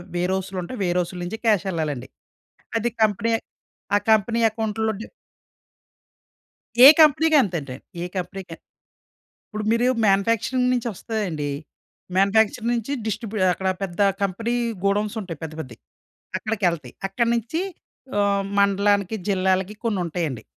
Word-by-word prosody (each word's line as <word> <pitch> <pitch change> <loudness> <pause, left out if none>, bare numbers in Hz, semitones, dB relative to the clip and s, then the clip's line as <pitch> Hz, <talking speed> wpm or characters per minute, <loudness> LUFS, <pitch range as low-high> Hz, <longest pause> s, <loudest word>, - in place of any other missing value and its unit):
Wear 180 +2 0
హౌస్‌లుంటయి. 190 +4 -4
Wear 180 0 +1
హౌస్‌లు 180 0 -3
నుంచి 190 +6 -4
క్యాషెళ్ళాలండి. 165 - 0 0.7
అది 235 +2 0
కంపెనీ 215 +2 +1 0.6
ఆ - - +6
కంపెనీ 220 +2 +3
అకౌంట్‌‌లులో 220 0 -1
డి - - -6 1.8
ఏ - - +14
కంపెనీకి 315 +1 +5
అం‌తంటే, 155 - -3 0.3
ఏ - - -2
కంపెనీకైన 180 -2 -6 0.9
ఇప్పుడు 215 0 -5
మీరు 230 +2 +2 0.2
మాన్యుఫ్యాక్చరింగ్ 230 +5 +2
నించి 245 -1 0
వస్తాయండి. 185 -9 -3 0.7
మాన్యుఫ్యాక్చరింగ్ 220 +4 +3
నించి 235 +3 -3
డిస్ట్రిబ్యూ 220 -1 -3
అక్కడ 190 +2 -2
పెద్ద 185 -1 -4 0.2
కంపెనీ 225 +5 -1 0.3
గోడౌన్స్ 205 +2 +1
ఉంటాయి. 175 -6 -7
పెద్ద 160 -1 -5
పెద్దయి. 125 -6 -9 0.6
అక్కడికెళ్తాయి. 175 - -2
అక్కడి 230 +4 0
నించి 240 - -2 0.6
ఆహ్, 200 -1 +2
మండలానికి, 200 0 +2
జిల్లాలకి 190 0 +1
కొన్నుంటాయండి. 175 - -2
200 Hz, 115 wpm, -23 LUFS, 180-225 Hz, 1.8 s, ఏ